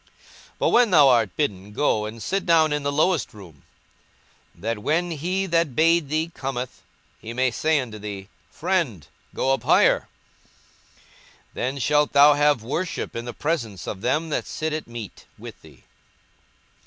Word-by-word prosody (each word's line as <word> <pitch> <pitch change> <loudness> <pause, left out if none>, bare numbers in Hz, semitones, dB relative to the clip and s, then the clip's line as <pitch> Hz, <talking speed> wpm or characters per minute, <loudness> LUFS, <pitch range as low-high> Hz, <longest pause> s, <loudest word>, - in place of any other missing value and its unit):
42:014:010 - - -32 0.5
But - - +1
when 240 -2 +4
thou 150 -7 +6
art 115 -7 +2
bidden, 105 -8 -2
go 110 -4 +1
and 110 +1 -8
sit 195 0 -1
down 160 -4 +3
in 150 - -1
the 140 0 -1
lowest 155 -3 0
room; 85 -9 -14 0.9
that 110 +5 -3
when 165 +10 0
he 180 +5 -2
that 165 -7 0
bade 165 -2 +3
thee 160 +2 -1
cometh, 130 -2 -5 0.4
he 115 - -8
may 130 +1 +1
say 155 +5 +1
unto 115 -5 -6
thee, 100 -2 -7 0.2
Friend, 160 - -2 0.3
go 135 - +1
up 135 - -2
higher: - - +3 1.5
then 130 +3 -3
shalt 150 +2 +1
thou 145 +1 +7
have 145 -4 +2
worship 165 +9 -4
in 115 0 -5
the 120 - -5
presence 120 - -3
of 95 - -5
them 150 +8 0
that 150 - -2
sit 155 0 -3
at 155 - -4
meat 115 -4 -9
with - - -11
thee. - - -18
140 Hz, 165 wpm, -23 LUFS, 115-160 Hz, 1.5 s, thou